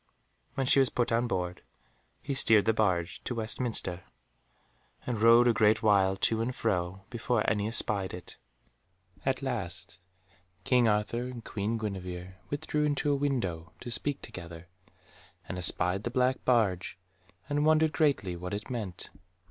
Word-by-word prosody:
When 135 -2 0
she 135 - +5
was 135 -2 +4
put 120 -1 -1
on 115 +2 +2
board, 90 -5 -3 0.6
he 140 - -2
steered 115 -6 +4
the 110 - +3
barge 95 -6 0
to 125 - -3
Westminster 110 -5 0 1.0
and 120 -4 -3
rowed 115 +2 +7
a 120 - +5
great 110 0 +3
while 95 -3 +3
to 110 +2 +2
and 125 +2 -2
fro, 90 -3 -1
before 120 -2 0
any 105 -1 +1
espied 105 -4 -1
it. 90 - -10 0.9
At 135 +1 0
last 90 -8 -4 0.6
King 125 0 +3
Arthur 110 +3 0
and 120 -3 -8
Queen 105 +2 -2
Guenevere 95 -3 -6
withdrew 150 +1 -1
into 145 0 +1
a - - +3
window, 100 - -2
to 120 - -6
speak 145 +3 -3
together, 85 -1 -9 0.8
and 90 - -5
espied 90 +2 +2
the 120 - -2
black 125 +1 +1
barge, 100 -9 +1 0.5
and 145 0 0
wondered 155 0 +3
greatly 135 - +1
what 90 +3 -5
it 105 +5 -7
meant. 105 -8 -5
110 Hz, 150 wpm, -29 LUFS, 95-125 Hz, 1.0 s, rowed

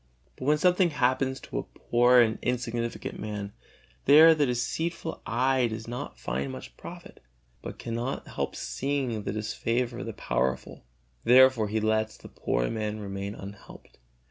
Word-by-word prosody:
But 130 - -7
when 150 +2 +4
something 180 +2 +3
happens 130 -2 +1
to - - -4
a - - -10
poor 120 +1 +5
and 110 -2 +1
insignificant 120 -1 -3
man, 105 -1 -5 0.5
there 155 +4 +9
the 150 -3 +2
deceitful 160 +7 -2
eye 130 +1 +2
does 110 0 -6
not 120 +1 -6
find 65 +2 -3
much 65 0 -9
profit, - - -11 0.4
but - - -7
cannot 120 +3 -4
help - - -3
seeing 135 -5 -2
the 100 - -3
disfavor 115 +3 -2
of 130 - -5
the 115 - -4
powerful; 65 -5 -2 0.4
therefore 130 -3 +6
he 110 +2 -1
lets 110 0 0
the - - -12
poor - - -1
man 110 -1 -3
remain 100 0 -5
unhelped. 100 -8 -12
120 Hz, 150 wpm, -28 LUFS, 105-130 Hz, 0.5 s, there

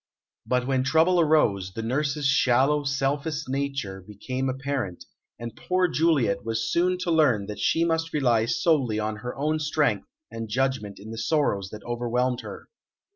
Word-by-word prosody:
But 125 -1 +1
when 130 -1 +1
trouble 160 +5 +3
arose, 105 - +2
the 115 - -4
nurse's 140 +4 -1
shallow, 135 +1 +3
selfish 140 +2 -1
nature 135 -8 -3
became 125 +7 -4
apparent, 135 -8 -3 0.3
and 120 -1 -7
poor 185 0 +1
Juliet 150 -12 +1
was 115 +1 -2
soon 180 +2 +2
to 175 - -1
learn 135 -11 +3
that 105 +1 -7
she 165 +1 +2
must 165 0 -1
rely 120 -6 +2
solely 130 -7 +1
on 110 0 -2
her 125 +3 -6
own 155 +3 0
strength 150 0 0 0.2
and 115 -1 -6
judgment 125 -4 -1
in 105 +3 -10
the 115 - -6
sorrows 110 - 0
that 105 0 -10
overwhelmed 120 +1 -1
her. - - -9
130 Hz, 160 wpm, -25 LUFS, 115-150 Hz, 0.3 s, trouble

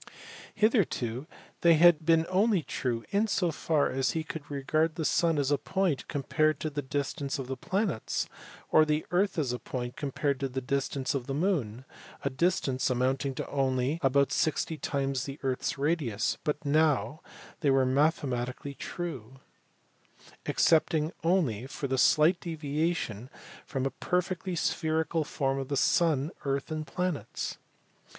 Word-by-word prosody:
Hitherto 160 - +1 0.3
they 170 -1 +6
had 165 -1 +5
been 165 -1 +5
true 170 - -10
only 195 -2 +3 0.5
in 205 +3 +2
so 185 -4 +1
far 155 -1 +1
as 130 0 0
he 160 - -1
could 155 -2 -7
regard 155 +3 0
the 160 -3 -2
sun 165 0 +2
as 140 -1 +1
a 145 - +2
point 190 -8 -1
compared 155 +2 +1
to 155 - -2
the 145 0 -2
distance 140 +1 -3
of 135 - -4
the 130 +1 -4
planets, 185 - -1 0.4
or 155 - +7
the 155 0 0
earth 190 +2 +1
as 135 -6 0
a 125 - -3
point 120 +1 -5
compared 140 -1 -1
to 135 - -1
the 130 +1 -3
distance 135 0 -1
of 130 -3 -3
the 135 - -2
moon 140 - -1 0.4
a 140 - 0
distance 135 -3 +1
amounting 130 +2 0
to - - -4
only 135 +2 0
about 140 0 +3
sixty 160 +1 0
times 135 -3 -2
the 140 0 -6
earth 130 -1 0
s - - -2
radius 140 -7 0
but 150 0 -2
now 150 0 +2 0.4
they 150 - +2
were 135 -1 +4
mathematically 130 -2 0
true, 135 -7 -6 1.1
excepting 160 -1 +3
only 150 - +1
for 140 0 -4
the 130 -1 0
slight 160 +7 +5
deviation 150 - -2 0.4
from 135 -1 -2
a 135 - 0
perfectly 180 +4 -2
spherical 160 0 0
form 135 -2 -1
of 135 - -4
the 140 - -1
sun, 155 -2 +2
earth 140 +1 -2
and 155 0 -3
planets. 180 -4 -3
145 Hz, 155 wpm, -29 LUFS, 135-165 Hz, 1.1 s, or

